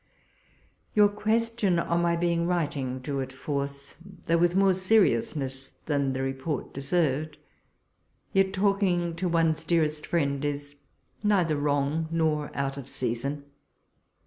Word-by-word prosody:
Your 210 Hz, -1 st, +6 dB
question 215 Hz, -2 st, +1 dB
on 170 Hz, 0 st, +1 dB
my 170 Hz, 0 st, +2 dB
being 170 Hz, 0 st, +1 dB
writing 145 Hz, -7 st, -1 dB
drew 140 Hz, +1 st, -3 dB
it 130 Hz, 0 st, -4 dB
forth, 140 Hz, +1 st, -5 dB, 0.3 s
though 170 Hz, 0 st, +2 dB
with 175 Hz, +1 st, +3 dB
more 195 Hz, 0 st, +5 dB
seriousness 140 Hz, -, +1 dB
than 140 Hz, -3 st, 0 dB
the 130 Hz, 0 st, -2 dB
report 135 Hz, +3 st, -3 dB
deserved 150 Hz, +1 st, 0 dB, 0.5 s
— -, -, -43 dB
yet 195 Hz, 0 st, +3 dB
talking 190 Hz, -4 st, +1 dB
to 180 Hz, +1 st, -1 dB
one's 165 Hz, -1 st, +2 dB
dearest 155 Hz, -3 st, 0 dB
friend 140 Hz, -4 st, 0 dB
is 145 Hz, 0 st, -3 dB, 0.5 s
neither 190 Hz, -7 st, +2 dB
wrong 145 Hz, +2 st, 0 dB
nor 155 Hz, -3 st, 0 dB
out 135 Hz, 0 st, -2 dB
of 135 Hz, -1 st, -8 dB
season. 140 Hz, +4 st, -3 dB
155 Hz, 130 wpm, -27 LUFS, 140-175 Hz, 0.5 s, Your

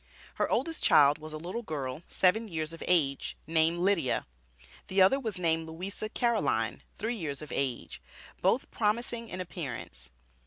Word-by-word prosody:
Her -, -, +2 dB
oldest 330 Hz, -1 st, 0 dB
child 145 Hz, 0 st, +6 dB
was 155 Hz, 0 st, -8 dB
a 155 Hz, -, -4 dB
little 180 Hz, +9 st, -4 dB
girl 145 Hz, -, -4 dB
seven 220 Hz, +5 st, +3 dB
years 160 Hz, -3 st, -3 dB
of 165 Hz, -, -10 dB
age, 145 Hz, -6 st, +2 dB
named 160 Hz, +1 st, +2 dB
Lydia; 180 Hz, -7 st, +1 dB, 0.6 s
the 190 Hz, -, 0 dB
other 190 Hz, +9 st, +6 dB
was 220 Hz, -7 st, -3 dB
named 165 Hz, -2 st, +1 dB
Louisa 190 Hz, +6 st, -5 dB
Caroline, 235 Hz, 0 st, +1 dB, 0.2 s
three 220 Hz, +3 st, -1 dB
years 155 Hz, -, -4 dB
of 150 Hz, -, -9 dB
age, 130 Hz, -, -2 dB, 0.4 s
both -, -, +2 dB
promising 230 Hz, +2 st, -1 dB
in 185 Hz, -, -5 dB
appearance. 130 Hz, -, -6 dB
170 Hz, 155 wpm, -30 LUFS, 155-210 Hz, 0.6 s, child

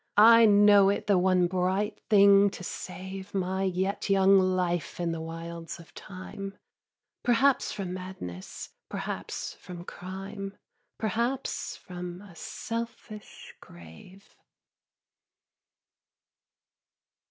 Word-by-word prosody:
I 230 Hz, +1 st, +8 dB
know 205 Hz, -1 st, +6 dB
it 200 Hz, -, -1 dB
the 200 Hz, -3 st, +4 dB
one 180 Hz, -1 st, +3 dB
bright 185 Hz, +4 st, -1 dB
thing 200 Hz, -1 st, +7 dB
to -, -, -9 dB
save 190 Hz, +2 st, -7 dB
My 190 Hz, 0 st, -1 dB
yet 190 Hz, +2 st, -1 dB
young 195 Hz, 0 st, +6 dB
life 180 Hz, -3 st, 0 dB
in 170 Hz, -1 st, 0 dB
the 165 Hz, -1 st, -4 dB
wilds 165 Hz, +1 st, -7 dB
of 165 Hz, -, -15 dB
Time, 195 Hz, +1 st, -8 dB, 0.6 s
Perhaps 255 Hz, +3 st, +3 dB
from 195 Hz, -3 st, -4 dB
madness, 185 Hz, -, -7 dB, 0.2 s
perhaps -, -, -5 dB
from 175 Hz, -1 st, -10 dB
crime, 195 Hz, +3 st, -7 dB, 0.4 s
Perhaps 235 Hz, +5 st, -2 dB
from 180 Hz, -1 st, -8 dB
a 195 Hz, -3 st, -14 dB
selfish 230 Hz, +2 st, -7 dB
grave. 85 Hz, -, -15 dB
190 Hz, 100 wpm, -28 LUFS, 180-205 Hz, 0.6 s, I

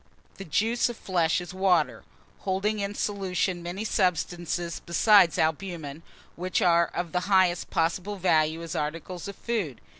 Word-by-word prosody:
THE 195 Hz, -, -8 dB
JUICE 225 Hz, +10 st, +1 dB
OF 240 Hz, -, -6 dB
FLESH 175 Hz, -2 st, +1 dB
IS 175 Hz, +1 st, -8 dB
WATER, 185 Hz, -4 st, +1 dB, 0.4 s
holding 200 Hz, +3 st, -1 dB
in 200 Hz, 0 st, -3 dB
solution 190 Hz, -3 st, -1 dB
many 175 Hz, +4 st, -5 dB
substances 175 Hz, -3 st, -1 dB
besides 180 Hz, 0 st, +5 dB
albumen, 160 Hz, -2 st, -2 dB, 0.3 s
which 180 Hz, +2 st, -1 dB
are 170 Hz, -1 st, +4 dB
of 175 Hz, -2 st, -4 dB
the 180 Hz, -, +1 dB
highest 185 Hz, -3 st, +3 dB
possible 175 Hz, +5 st, -1 dB
value 160 Hz, -3 st, +1 dB
as 165 Hz, -, -6 dB
articles 165 Hz, +5 st, -4 dB
of 200 Hz, -, -7 dB
food. 195 Hz, -, -3 dB
180 Hz, 145 wpm, -27 LUFS, 165-195 Hz, 0.4 s, besides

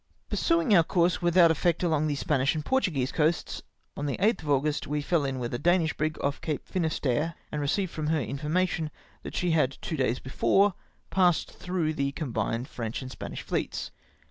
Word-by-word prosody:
Pur -, -, 0 dB
suing 335 Hz, -5 st, +2 dB
om^ 170 Hz, -6 st, +5 dB
course 175 Hz, -2 st, +2 dB
without 175 Hz, -1 st, +5 dB
efiect 170 Hz, +2 st, +1 dB
along 155 Hz, -3 st, +2 dB
the 145 Hz, -, 0 dB
Spanish 140 Hz, -1 st, +1 dB
and 155 Hz, -, -3 dB
Portuguese 160 Hz, -, +1 dB
coasts 160 Hz, +1 st, 0 dB, 0.2 s
— -, -, -45 dB
on 145 Hz, -, -3 dB
the 140 Hz, -, -2 dB
8th 215 Hz, +5 st, +2 dB
of 150 Hz, -, -7 dB
August 145 Hz, +1 st, +1 dB
we 150 Hz, +1 st, -1 dB
fell 155 Hz, +1 st, +1 dB
in 135 Hz, -1 st, -2 dB
with 120 Hz, -2 st, -4 dB
a 120 Hz, -, -2 dB
Danish 175 Hz, -2 st, +2 dB
brig 155 Hz, +1 st, -1 dB
ofl" 140 Hz, 0 st, -2 dB
Cape 150 Hz, -4 st, -3 dB
Finisterre, 160 Hz, -3 st, 0 dB, 0.2 s
and 150 Hz, -, -2 dB
received 175 Hz, +6 st, 0 dB
from 155 Hz, -1 st, -3 dB
her 160 Hz, 0 st, +2 dB
information 155 Hz, -, -1 dB, 0.3 s
that -, -, -8 dB
she 180 Hz, -1 st, +1 dB
had 150 Hz, -4 st, +2 dB
two 160 Hz, -, -4 dB
days 130 Hz, -2 st, +1 dB
before 195 Hz, +10 st, +2 dB, 0.4 s
passed 180 Hz, -3 st, +3 dB
through 175 Hz, -4 st, -2 dB
the 140 Hz, -2 st, -1 dB
combined 120 Hz, -4 st, -2 dB
French 115 Hz, 0 st, -5 dB
and 130 Hz, -, -7 dB
Spanish -, -, -7 dB
fleets. -, -, -3 dB
155 Hz, 195 wpm, -28 LUFS, 140-175 Hz, 0.4 s, om^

